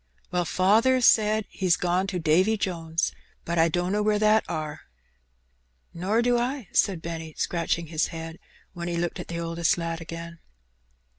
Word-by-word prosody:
'' - - -36
"Well, 180 -1 0
faather 220 +10 +3
says 215 -1 +4
he's 185 -3 +1
gone 180 +2 0
to 190 -2 -2
Davy 180 +7 +3
Jones, 165 -5 -1 0.3
but 170 0 -1
I 165 +1 +5
danno 180 +5 0
where 210 0 +2
that 215 +1 +4
are." 155 -1 -4 1.1
"Nor 185 +6 -1
I - - +4
too," 245 +1 0
said 185 -5 +2
Benny, 165 -2 -6
scratching 170 0 -1
his 160 0 0
head. 165 0 -7 0.4
Then 170 0 -5
he 170 -1 -2
looked 175 0 -2
at - - -6
the 170 0 -4
oldest 165 0 0
lad 165 -1 -3
again. 165 +1 -8
175 Hz, 165 wpm, -26 LUFS, 165-210 Hz, 1.1 s, I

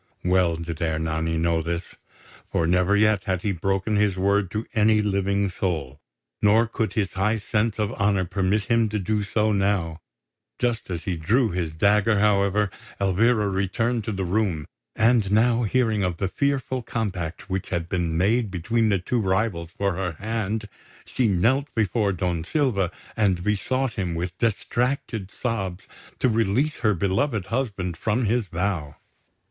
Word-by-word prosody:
Well 90 -2 +3
did 85 -1 -6
Ernani 80 0 -1
know 85 0 +1
this; 85 +2 -4 0.6
for 80 - +1
never 90 +4 +3
yet 105 -2 +3
had 95 -2 -1
he 105 - +1
broken 95 +4 0
his 105 -3 +2
word 100 0 +2
to 110 +4 -3
any 110 0 +4
living 100 -1 +1
soul, 80 -8 -3 0.4
nor 110 +3 +5
could 110 -1 -2
his 105 -5 -1
high 105 +4 +1
sense 110 0 -1
of 105 +1 -1
honour 100 -4 +1
permit 95 +3 0
him 115 0 +2
to 105 - -1
do 105 +2 0
so 105 +1 +1
now. 95 -5 0 0.6
Just 120 -4 -1
as 85 -3 -4
he 90 -3 -2
drew 110 +9 +2
his 85 -3 -2
dagger, 105 +5 +3
however, 100 -1 +2 0.3
Elvira 105 +3 +2
returned 105 +5 0
to - - -2
the 95 -2 -2
room; 90 -5 0 0.3
and 110 -3 +3
now 115 +3 +3
hearing 110 -2 +1
of 90 -3 -1
the 95 - -1
fearful 135 +2 -1
compact 100 -5 -4
which 95 -2 -3
had 85 -2 -2
been 85 -3 -1
made 110 +5 +2
between 110 +5 0
the 100 - +3
two 115 +6 -1
rivals 95 -3 0
for 100 +1 -1
her 90 -3 -2
hand, 110 +2 -3 0.4
she 125 - 0
knelt 120 +9 +2
before 105 -1 +1
Don 90 -3 -1
Silva 100 - +1 0.3
and 95 -6 +1
besought 115 +5 0
him, 95 -7 -2
with 85 +2 -3
distracted 115 -1 -1
sobs, 100 -6 -3 0.3
to - - +2
release 115 +6 +1
her 105 -4 +2
beloved 100 - 0
husband 100 -7 -2
from 110 +7 0
his 115 0 +1
vow. 85 -5 -2
100 Hz, 160 wpm, -24 LUFS, 90-110 Hz, 0.6 s, nor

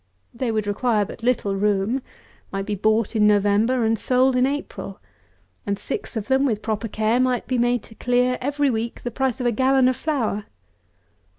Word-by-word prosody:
They 235 0 -2
would 215 -1 -1
require 210 +1 +1
but - - -10
little 230 -5 0
room, 205 +5 0 0.5
might 195 0 -3
be 210 - -2
bought 220 +3 +1
in 210 -1 +4
November 210 +4 +3
and 225 -1 +1
sold 255 0 +3
in 250 +1 +3
April, 290 +1 -5 0.6
and 200 0 -2
six 225 - -4
of 215 - -4
them, 265 +1 +3
with 220 -6 0
proper 220 0 -2
care, 220 +3 0
might 255 -1 +1
be 255 -1 -1
made 240 -1 +1
to - - -14
clear 250 +2 +1
every 285 +1 +1
week 230 0 -4
the 240 - -3
price 265 0 -1
of 250 - -2
a 240 - +3
gallon 260 +2 +3
of 255 - +2
flour. 235 -10 -2
235 Hz, 190 wpm, -23 LUFS, 210-255 Hz, 0.6 s, in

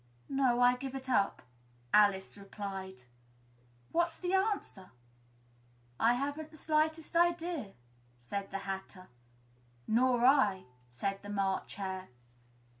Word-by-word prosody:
"No, 260 -3 +2
I 245 0 +5
give 270 +1 -6
it 265 0 -6
up," 200 -6 +1 0.5
Alice 200 -2 +4
replied. 195 -5 -7 0.9
"What's 340 -1 +1
the 360 +1 -2
answer?" 385 - -1 1.1
"I 235 +2 +5
haven't 285 +4 -3
the 310 - -15
slightest 315 +1 0
idea," 340 - +1 0.4
said 195 +12 -5
the 195 - -3
Hatter. 190 -1 -6 0.8
"Nor 245 +1 +3
I," 265 -9 +4 0.3
said 195 +11 -3
the 205 - -9
March 195 -2 -1
Hare. 190 -1 -4
240 Hz, 115 wpm, -32 LUFS, 195-305 Hz, 1.1 s, I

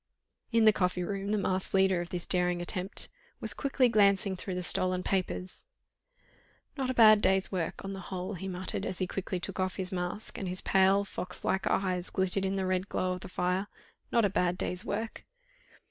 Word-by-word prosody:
In 230 -1 +4
the 215 - +7
coffee 180 -2 0
room 195 +2 -3
the 215 - +2
masked 190 -1 0
leader 190 -2 +4
of 175 - -6
this 175 -2 -4
daring 180 -1 +1
attempt 180 +2 -3 0.3
was - - -1
quickly 270 -2 +2
glancing 200 -3 +3
through 185 0 -5
the 180 - -3
stolen 185 +1 +1
papers. 185 - -2 1.1
"Not 265 -3 -2
a 260 - -1
bad 215 -2 +8
day's 190 -1 +2
work 180 -1 -3
on 195 - -4
the 195 - -6
whole," 185 +1 -4
he 190 +1 -5
muttered, 185 0 -4
as 185 - -3
he 185 - 0
quietly 185 0 -3
took 180 - -4
off 185 0 0
his 185 -1 -3
mask, 180 +3 -4
and 195 - -3
his 180 +1 -1
pale, 195 +1 +4
fox 180 -2 -6
like 190 0 +1
eyes 185 -2 0
glittered 190 +1 +1
in 190 +1 0
the 190 -1 -1
red 185 +1 -1
glow 185 - 0
of 180 - -5
the - - -9
fire. 180 +2 -1 0.4
"Not 235 -2 +4
a - - +3
bad 180 -1 +1
day's 180 0 -1
work." 220 +2 -4
190 Hz, 205 wpm, -30 LUFS, 180-200 Hz, 1.1 s, bad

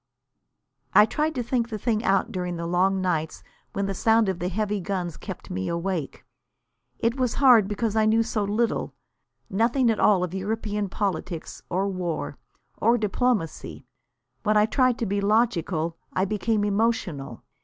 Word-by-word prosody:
I 210 - +9
tried 305 +7 -1
to 250 - -1
think 235 0 -1
the 220 - -4
thing 220 +1 -1
out 195 -3 +2
during 180 -1 -3
the 170 0 -4
long 185 +3 +2
nights 160 -4 -2 0.3
when 200 - -1
the 195 - -2
sound 220 +2 +3
of 185 -2 -2
the 180 - -1
heavy 210 +2 -1
guns 180 -3 -3
kept - - -8
me 95 0 -3
awake. 170 -3 -3 0.7
It 230 +3 0
was 250 -2 0
hard, 245 -7 +6
because 210 +1 -2
I 215 -1 +3
knew 225 +1 +4
so 225 -2 -1
little, 215 +3 -1 0.5
nothing 235 +4 +2
at 220 - -2
all 195 -4 +4
of 180 -1 -3
European 205 +1 -2
politics, 180 -4 -3
or 190 +3 0
war, 175 -6 -3 0.4
or 230 +3 +3
diplomacy. 210 -5 -1 0.6
When 215 -1 +2
I 210 - +5
tried 255 +1 +2
to 230 - -2
be 200 0 -1
logical, 190 -6 +1 0.2
I 185 - +1
became 210 +1 0
emotional. 200 - -1
205 Hz, 165 wpm, -25 LUFS, 180-225 Hz, 0.7 s, I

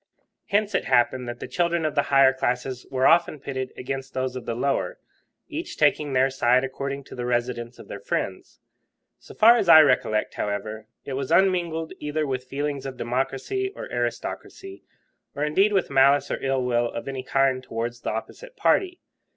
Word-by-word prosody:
Hence 210 +1 +1
it - - 0
happened 125 +1 +2
that 120 0 -7
the - - -6
children 170 -2 0
of 155 - -1
the 145 - +3
higher 135 -1 +6
classes 125 0 -2
were 130 -1 0
often 170 -3 +4
pitted 130 -2 -5
against 135 +1 -5
those 130 -1 -2
of 125 -2 -7
the 115 - -2
lower, 135 +3 -1 0.5
each - - -6
taking 150 -2 +2
their 130 +1 +3
side 125 -1 +3
according 140 +1 -4
to - - -13
the 125 0 -4
residence 120 0 -2
of - - -13
their 100 - -7
friends. 95 -1 -4 0.6
So - - -14
far 230 +2 +7
as 195 -6 0
I 160 -1 +11
recollect, 120 -7 +1
however, 110 +1 -4 0.2
it 140 - -5
was 130 0 -3
unmingled 170 -4 +2
either 150 +1 -2
with 130 -2 -3
feelings 140 +1 -3
of 130 -2 -7
democracy 135 - -2
or - - -6
aristocracy, 385 0 -5 0.5
or 145 - -2
indeed 195 +8 +3
with 195 -7 0
malice 140 +1 +4
or - - -3
ill 135 -1 0
will 120 -1 +1
of 115 - -6
any 135 -1 -4
kind 135 0 +1
towards 120 -1 -5
the - - -3
opposite - - -7
party. 360 -2 +1
135 Hz, 185 wpm, -24 LUFS, 125-155 Hz, 0.6 s, I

